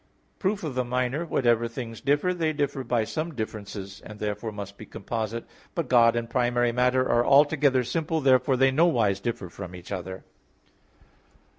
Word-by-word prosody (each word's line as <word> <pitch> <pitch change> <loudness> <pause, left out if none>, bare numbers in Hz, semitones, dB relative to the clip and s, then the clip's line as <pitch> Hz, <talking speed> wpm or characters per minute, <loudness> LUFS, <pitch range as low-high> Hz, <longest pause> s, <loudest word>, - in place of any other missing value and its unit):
Proof 195 0 -1
of 155 -4 -3
the 125 0 0
minor 125 +6 -1
whatever 120 -6 +2
things 115 -1 -7
differ, 145 +6 +2
they 160 -3 0
differ 145 -2 -2
by 120 -2 +1
some 155 +7 -4
differences, 100 -3 -6
and 105 - -10
therefore 105 +1 -3
must 100 -1 -7
be 110 - -11
composite. 115 +2 -4 0.3
But 165 -7 -2
God 120 -2 +5
and 120 -1 -2
primary 120 -1 +1
matter 125 +1 +2
are 120 - +3
altogether 140 -1 +4
simple. 160 +4 -1
Therefore 130 -1 +3
they 135 +1 +4
nowise 120 - +2
differ 105 -3 -3
from 90 +1 -9
each 90 +2 -11
other. 95 -1 -5
120 Hz, 165 wpm, -26 LUFS, 110-140 Hz, 0.3 s, God